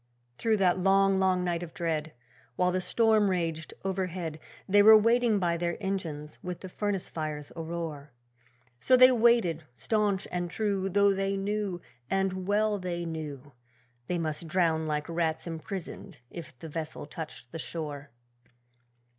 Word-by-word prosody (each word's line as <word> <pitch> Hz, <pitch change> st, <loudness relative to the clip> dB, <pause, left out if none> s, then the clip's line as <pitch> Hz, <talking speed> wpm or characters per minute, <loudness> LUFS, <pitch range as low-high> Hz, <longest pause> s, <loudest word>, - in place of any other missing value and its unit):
Through 225 Hz, -1 st, +2 dB
that 185 Hz, -2 st, +3 dB
long, 195 Hz, +1 st, +4 dB
long 185 Hz, -1 st, +2 dB
night 175 Hz, -1 st, -1 dB
of 170 Hz, -2 st, -8 dB
dread, 160 Hz, -2 st, -2 dB, 0.4 s
While 180 Hz, +4 st, +2 dB
the 185 Hz, +1 st, 0 dB
storm 220 Hz, 0 st, +3 dB
raged 165 Hz, -3 st, -2 dB
overhead, 180 Hz, -4 st, -3 dB, 0.3 s
They 205 Hz, +1 st, +6 dB
were 220 Hz, +1 st, +9 dB
waiting 230 Hz, 0 st, +3 dB
by 170 Hz, -3 st, +1 dB
their 170 Hz, 0 st, -2 dB
engines, 165 Hz, -7 st, -4 dB
with 180 Hz, -1 st, -6 dB
the 185 Hz, -, -7 dB
furnace 200 Hz, -1 st, -2 dB
fires 155 Hz, -2 st, -5 dB
aroar. 160 Hz, -3 st, -5 dB, 0.7 s
So 255 Hz, -, +4 dB
they 255 Hz, +1 st, +8 dB
waited, 230 Hz, -9 st, +3 dB
staunch 210 Hz, -, 0 dB
and 175 Hz, -1 st, -2 dB
true, 195 Hz, -1 st, -1 dB
Though 200 Hz, +1 st, +4 dB
they 195 Hz, 0 st, -1 dB
knew, 200 Hz, -2 st, -2 dB, 0.3 s
and 190 Hz, -1 st, -1 dB
well 210 Hz, 0 st, +2 dB
they 175 Hz, -2 st, -3 dB
knew, 150 Hz, -4 st, -6 dB, 0.6 s
They 180 Hz, -, -1 dB
must 160 Hz, 0 st, -3 dB
drown 160 Hz, -2 st, +1 dB
like 150 Hz, -1 st, -2 dB
rats 165 Hz, -1 st, -1 dB
imprisoned 170 Hz, 0 st, -7 dB
if 165 Hz, -7 st, -9 dB
the 160 Hz, -, -9 dB
vessel 155 Hz, -1 st, -5 dB
touched 150 Hz, -6 st, -8 dB
the 165 Hz, -, -6 dB
shore. 150 Hz, -4 st, -5 dB
180 Hz, 150 wpm, -29 LUFS, 160-195 Hz, 0.7 s, were